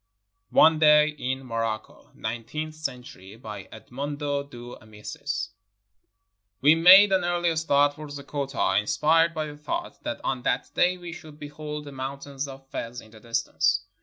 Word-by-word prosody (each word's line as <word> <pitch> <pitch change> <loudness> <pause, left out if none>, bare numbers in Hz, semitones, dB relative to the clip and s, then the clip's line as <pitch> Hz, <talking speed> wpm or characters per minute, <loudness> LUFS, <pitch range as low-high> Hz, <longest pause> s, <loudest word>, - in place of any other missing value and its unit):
ONE 160 0 +5
DAY 150 -1 +6
IN 130 -3 -4
MOROCCO 115 -2 -4
[Nineteenth 120 +8 -5
century] 125 -10 -7
BY 105 -4 -9
EDMONDO 145 +5 -4
DE 120 -1 -9
AMICIS 105 -1 -5 1.1
We 145 +4 +6
made 185 +5 +8
an 190 -2 +3
early 175 -1 +1
start 145 -2 +3
for 155 +1 -9
Zeggota, 140 -4 -1
inspired 165 +9 +2
by 155 -1 -1
the 145 -1 -9
thought 340 - -5
that 300 -1 -4
on 130 -2 -1
that - - -1
day 180 +1 +2
we 175 -2 -8
should 155 -3 -12
behold 150 0 -7
the 145 - -8
moun 135 +1 -5
tains 140 0 -6
of 135 0 -11
Fez 120 +1 -5
in 110 - -15
the 110 - -14
distance. 105 -3 0
145 Hz, 155 wpm, -26 LUFS, 120-155 Hz, 1.1 s, made